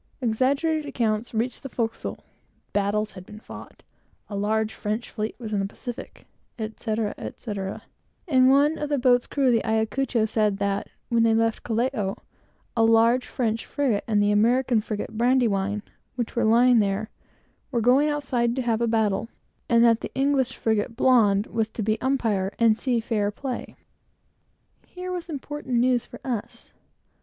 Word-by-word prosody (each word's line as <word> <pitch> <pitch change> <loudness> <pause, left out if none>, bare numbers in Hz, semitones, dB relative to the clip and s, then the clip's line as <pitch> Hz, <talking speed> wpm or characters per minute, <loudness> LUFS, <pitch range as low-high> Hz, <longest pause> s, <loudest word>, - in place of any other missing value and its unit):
Exaggerated 275 +6 +1
accounts 230 -4 -1
reached 235 +3 -2
the 270 - -7
forecastle. 225 -2 -3 0.5
Battles 205 +1 0
had 185 -1 -10
been 210 +3 -12
fought, - - -12 0.5
a 205 - -5
large 215 +2 0
French 215 +3 -4
fleet 215 +1 -3
was 220 -3 -6
in 205 - +1
the 195 - 0
Pacific, 240 +4 -9 0.3
etc., 220 -1 -3
etc.; 195 -4 -5 0.4
and 260 -4 +5
one 290 +3 +4
of 295 - -3
the 290 - +1
boat's 245 -1 +3
crew 280 -2 0
of 250 - +5
the 230 - +2
Ayacucho 220 +2 0
said 215 -2 +1
that 200 0 -1 0.2
when 235 -1 +3
they 225 -1 +4
left 225 0 +1
Callao, 225 -4 -1 0.6
a 225 - +3
large 230 +2 +4
French 225 -2 -1
frigate 260 -8 0
and 210 -2 +2
the 205 - +3
American 235 +2 +3
frigate 215 0 -5
Brandywine, 215 -4 +1 0.3
which 240 -3 -3
were 235 -1 +2
lying 240 +2 +5
there, 205 +1 -1 0.6
were 245 - 0
going 255 +6 +4
outside 250 -5 0
to 260 - -1
have 230 -1 0
a 235 - +2
battle, 220 -1 +1 0.4
and 235 0 +5
that 230 -1 +4
the - - -5
English 270 -1 +1
frigate 220 +1 0
Blonde 220 -5 +4
was 225 -1 -1
to 220 - -4
be 215 +1 0
umpire, 225 -8 0
and 230 -2 +4
see 245 0 0
fair 220 -3 0
play. 250 +4 -6 1.1
Here 365 0 -7
was 355 -1 -5
important 295 -3 -4
news 245 0 +2
for - - -11
us. 235 -3 -5
230 Hz, 165 wpm, -25 LUFS, 215-255 Hz, 1.1 s, and